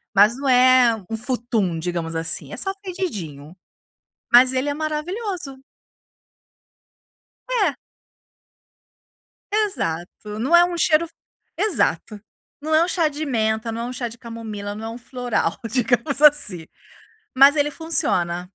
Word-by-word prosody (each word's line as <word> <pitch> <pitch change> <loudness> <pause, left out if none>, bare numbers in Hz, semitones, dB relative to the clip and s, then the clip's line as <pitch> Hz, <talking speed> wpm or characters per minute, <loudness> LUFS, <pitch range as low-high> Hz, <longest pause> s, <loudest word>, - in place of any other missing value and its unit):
mas 210 +5 +5
não 280 - -4
é 255 -2 +5
um 225 - -3
futum 225 -7 -2
digamos 165 -1 -4
assim, 165 +1 -2
é - - -6
só 385 - -2
fedidinho, 185 - -6 0.8
mas 255 +2 +7
ele 260 +3 -1
é 285 - -1
maravilhoso. 310 - -4 1.9
É. 415 - +1 1.8
Exato 210 - -3
não 270 +9 +3
é 345 - +8
um 350 -1 -4
cheiro 325 0 +3
f 335 - -17 0.4
exato, 215 - -1 0.4
não 310 +1 -2
é 315 - +5
um 345 - -1
chá 340 -3 +1
de 300 +2 -5
menta, 220 -3 -1
é - - -2
um 245 - -4
chá 240 -1 -3
de 230 +1 -11
camomila, 220 -4 -7
não 220 +1 -7
é - - -4
um 230 - -7
floral 245 -8 -2
digamos 260 +4 0
assim, 245 - +4 0.7
mas 275 +3 +7
ele 295 -1 +2
funciona. 180 - -1
250 Hz, 135 wpm, -22 LUFS, 210-310 Hz, 1.9 s, é